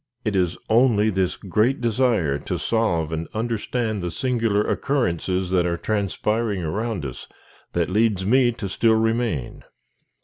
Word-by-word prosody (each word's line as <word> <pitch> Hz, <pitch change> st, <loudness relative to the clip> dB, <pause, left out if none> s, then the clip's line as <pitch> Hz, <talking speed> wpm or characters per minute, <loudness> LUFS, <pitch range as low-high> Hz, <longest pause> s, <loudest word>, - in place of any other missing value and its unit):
It 105 Hz, -2 st, 0 dB
is 90 Hz, -2 st, +1 dB
only 110 Hz, -2 st, +4 dB
this 95 Hz, -2 st, 0 dB
great 110 Hz, +8 st, +1 dB
desire 115 Hz, -, +1 dB
to -, -, -3 dB
solve 85 Hz, -9 st, 0 dB
and 80 Hz, 0 st, -3 dB
understand 115 Hz, -1 st, -2 dB
the 90 Hz, -, -2 dB
singular 115 Hz, 0 st, 0 dB
occurrences 95 Hz, -, -1 dB
that 90 Hz, -2 st, +2 dB
are 85 Hz, 0 st, -1 dB
transpiring 105 Hz, 0 st, -1 dB
around 100 Hz, +1 st, -2 dB
us, 65 Hz, -3 st, -7 dB, 0.5 s
that 85 Hz, -1 st, +1 dB
leads 105 Hz, -2 st, +2 dB
me 125 Hz, +3 st, +4 dB
to 115 Hz, -3 st, -5 dB
still 110 Hz, +4 st, +2 dB
remain. 115 Hz, -, -1 dB
105 Hz, 140 wpm, -23 LUFS, 90-115 Hz, 0.5 s, only